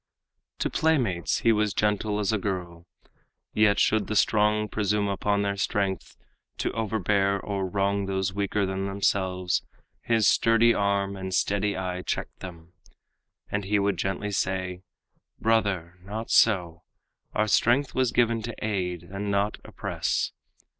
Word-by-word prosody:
To - - -1
playmates 125 - +1
he 115 - +4
was 105 -3 +1
gentle 105 0 0
as 105 +1 0
a 110 - +1
girl; 90 -3 -4 0.7
Yet 105 -1 +3
should 110 -3 +2
the 110 - -2
strong 105 +2 +3
presume 105 -1 0
upon 100 +1 0
their 100 0 -1
strength 100 -2 -2 0.4
To - - -1
overbear 100 -3 0
or 100 -2 -3
wrong 100 +1 0
those 95 -1 -1
weaker 100 0 0
than 95 +1 -2
themselves, 95 -2 0 0.4
His 115 -3 +2
sturdy 115 +1 +4
arm 100 -1 0
and 95 -1 -5
steady 100 +2 0
eye 90 -1 -3
checked - - -4
them, 85 -2 -10 0.8
And 100 0 -1
he 105 +2 +2
would 100 0 +1
gently 100 +2 -2
say, 95 -2 -2 0.6
"Brother, 100 -6 0
not 110 +4 -5
so; 90 -7 +3 0.5
Our 110 0 +2
strength 125 +6 +3
was 130 -2 +1
given 115 -1 +2
to 115 +1 -6
aid 90 -5 -2
and 100 +4 -5
not 100 +1 0
oppress." - - -2
100 Hz, 140 wpm, -26 LUFS, 95-105 Hz, 0.8 s, he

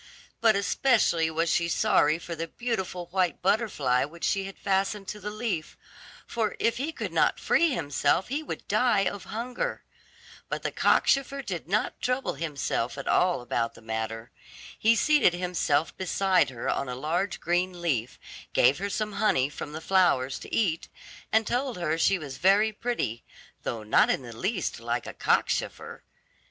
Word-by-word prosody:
But 225 -2 +4
especially 200 -6 +2
was 165 +1 0
she 170 - +2
sorry 165 -7 +3
for 170 0 -7
the 165 +1 -4
beautiful 190 -7 -3
white 185 -2 +1
butterfly 180 - +2
which 165 +4 -9
she 195 -1 +1
had 195 - -8
fastened 195 +1 -1
to 210 - -5
the 210 +1 -5
leaf, 210 -7 -3 0.5
for 220 -3 -2
if 230 - +1
he 285 +6 -2
could - - -5
not - - +2
free 335 - +3
himself 165 - +1
he 285 +4 -1
would 310 - -7
die 240 -5 +3
of 200 - -3
hunger. 240 +3 -4 0.7
But - - -3
the - - -1
cockchafer 275 0 +2
did 175 -8 -5
not 205 +4 -1
trouble 250 +2 0
himself 140 -4 -2
at 140 - -6
all 180 -7 +2
about 115 -1 -2
the - - -14
matter. 110 +1 -4 0.4
He 225 +1 +3
seated 295 - +4
himself 175 -4 0
by 190 - -5
her - - -9
side 190 -7 +2
on 125 +2 -2
a 125 - -3
large 170 +9 -1
green 175 +1 0
leaf, 130 -9 -1 0.4
gave 140 - +4
her 200 +1 -2
some 215 +1 -2
honey 195 -10 +2
from 145 - -7
the 155 +1 -6
flowers 160 -9 +2
to - - -11
eat, 175 -8 0 0.4
and 220 0 +3
told 250 0 -1
her 165 -3 0
she 195 +3 +3
was 140 -6 -7
very 200 +4 +4
pretty, 215 - -3 0.4
though 115 -2 -4
not 105 - +4
in - - 0
the 120 -2 -9
least 190 - -2
like - - -2
a - - -7
cockchafer. 470 +1 -1
185 Hz, 170 wpm, -27 LUFS, 150-215 Hz, 0.7 s, But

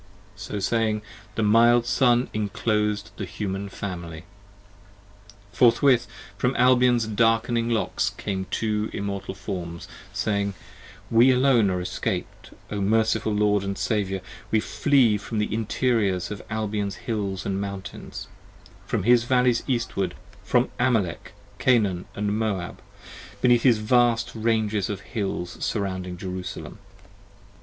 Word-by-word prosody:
So 105 0 -6
saying, 110 +1 0 0.3
the 110 - 0
mild 115 +3 +5
Sun 125 0 +3
inclos'd 105 0 -1
the 100 - -3
Human 95 +2 -4
Family. 85 -5 -6 1.3
Forthwith 125 +1 +4 0.3
from 125 +1 +1
Albion's 125 -2 +4
darkning 115 +2 +1
locks 115 -2 0
came 95 -2 -4
two 110 -1 -1
Immortal 100 -1 -4
forms, 85 -3 -6 0.2
Saying: 100 -2 -1 0.6
We 115 +3 +6
alone 125 -5 +4
are 90 -1 -1
escaped, 90 - -4 0.2
O 105 -1 -2
merciful 110 +2 +2
Lord 105 -1 +2
and 100 0 -3
Saviour, 95 -3 -1
30 95 - -18 0.2
We 110 - +3
flee 115 +1 +3
from 110 +2 -5
the 105 0 -1
interiors 110 -4 0
of 105 - -5
Albion's 105 -2 -2
hills 100 -4 -2
and 100 0 -1
mountains; 100 -1 -7 0.6
From - - -1
his 120 +2 +4
Valleys 125 -1 +3
Eastward; 105 -8 -1 0.3
from 125 +4 +2
Amalek, 110 - 0 0.3
Canaan 105 -8 +2
& - - -23
Moab; 105 -3 -2 0.6
Beneath 120 +1 +4
his 120 -3 +5
vast 120 +1 +2
ranges 110 -3 0
of 100 -2 -4
hills 95 -5 -4
surrounding 95 -4 -2
Jerusalem. 90 0 -6
105 Hz, 120 wpm, -25 LUFS, 100-115 Hz, 1.3 s, We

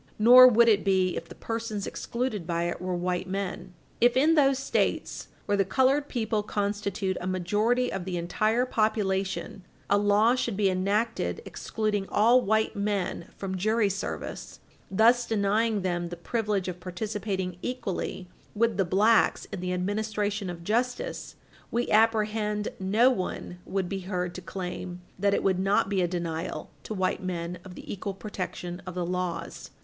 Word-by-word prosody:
Nor 250 +4 +9
would 235 -1 +5
it 210 -3 +4
be 185 -2 +2
if 165 - -6
the 175 - -10
persons 225 -3 -4
excluded 235 -8 -3
by 170 -1 0
it 175 0 -3
were 185 0 -2
white 180 +1 -2
men. 190 -1 -4 0.2
If, 240 +1 +4
in 305 +5 +5
those 275 -4 +4
States 270 - -1 0.2
where 205 - +1
the 200 - +3
colored 265 +8 +2
people 220 -3 -1
constitute 200 -2 -2
a 180 - -4
majority 210 +7 +1
of 190 -2 -3
the 180 -1 -3
entire 215 +8 +1
population, 200 -4 -1 0.3
a 200 - +5
law 205 +3 +4
should 240 -5 -1
be 200 -2 +3
enacted 210 - -1
excluding 210 -3 -2
all 235 +4 +5
white 220 0 +1
men 200 -4 -2
from 190 -1 -4
jury 215 +2 +2
service, 195 - -5 0.3
thus 235 +5 +4
denying 220 +1 +1
to 205 - -1
them 175 -2 -2
the 175 - -7
privilege 205 0 -1
of 180 -1 -5
participating 190 -1 -4 0.2
fully 190 -1 -3 0.3
with 230 +1 +1
the 195 - +2
blacks 210 +6 +3
in 195 - -4
the 180 0 -3
administration 205 +1 -1
of 170 -1 -7
justice, 240 +6 -2 0.3
we 240 +1 -1
apprehend 215 -1 +2
no 215 +7 +4
one 180 -4 -4
would 190 -1 -2
be 195 +1 -3
heard 180 -2 -3
to 185 - -7
claim 180 -1 -6 0.2
that 200 +1 +3
it - - -1
would 190 -2 +2
not 195 +1 +2
be 195 -2 +1
a 175 - +2
denial 170 -2 -4
to 215 - -6
white 185 -1 0
men 175 -1 -4
of 180 -1 -11
the - - -7
equal 195 0 -5
protection 185 -3 -5
of 180 - -6
the 180 -1 -1
laws. 180 -1 -4
200 Hz, 165 wpm, -27 LUFS, 185-220 Hz, 0.3 s, Nor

